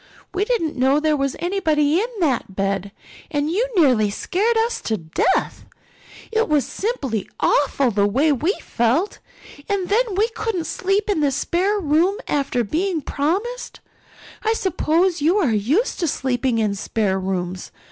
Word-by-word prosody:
We 385 +2 0
didn't 380 -10 -1
know 265 +2 +3
there 305 0 +2
was 275 -2 -1
anybody 325 -4 +1
in 445 - 0
that 255 - 0
bed 195 0 -1 0.4
and 290 0 -1
you 445 +8 +1
nearly 250 - +4
scared 410 - 0
us 460 +1 0
to 220 - -1
death. 160 -3 -1 0.6
It 450 -3 +1
was 300 -3 +2
simply 270 - -3
awful 275 -3 +2
the 200 -1 +2
way 275 +9 +2
we 300 +7 +1
felt. 250 - 0 0.5
And 395 -3 -1
then 440 -1 +1
we 420 +4 +3
couldn't 440 -6 -3
sleep 390 +5 0
in 410 -6 +1
the 290 -2 +3
spare 360 +9 0
room 340 +4 +2
after 275 -4 0
being 330 - -1
promised. 395 - -2 0.6
I 445 0 +1
suppose 360 -3 +1
you 335 +7 +3
are 320 - +2
used 270 - +1
to 340 - 0
sleeping 255 -3 0
in 215 -2 +1
spare 200 -1 -1
rooms. 185 -1 -3
305 Hz, 155 wpm, -21 LUFS, 245-390 Hz, 0.6 s, nearly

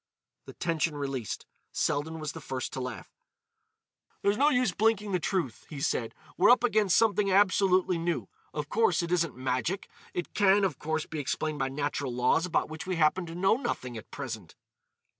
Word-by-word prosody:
The - - -10
tension 165 -2 -1
released, 135 -6 -4 0.3
Selden 160 +3 -1
was 155 -2 -3
the - - -9
first 130 -1 -4
to - - -3
laugh. 125 -3 -6 1.1
"There's 200 +1 +3
no 285 +6 +4
use 250 -7 +2
blinking 210 -1 +1
the 180 - +1
truth," 170 - -2
he 150 - -6
said; 120 -4 -1 0.2
"we're - - +5
up 245 0 +6
against 215 -6 +3
something 210 -3 +3
absolutely 185 -2 +3
new. 165 - -1 0.2
Of 150 -1 -4
course, 190 -3 +2
it 170 - -4
isn't 170 -5 +1
magic. 130 +9 -1 0.3
It 175 - -3
can, 200 0 +4
of 170 -8 0
course, 155 0 -2
be 155 - -5
explained 150 +2 -2
by 135 0 0
natural 140 -1 -2
laws 125 +8 +2
about 170 - +1
which 155 +3 -7
we 185 - 0
happen 170 +3 +2
to 165 - -7
know 190 +5 +3
nothing 125 - -3
at 110 - -9
present." 115 - -7
165 Hz, 180 wpm, -29 LUFS, 140-195 Hz, 1.1 s, up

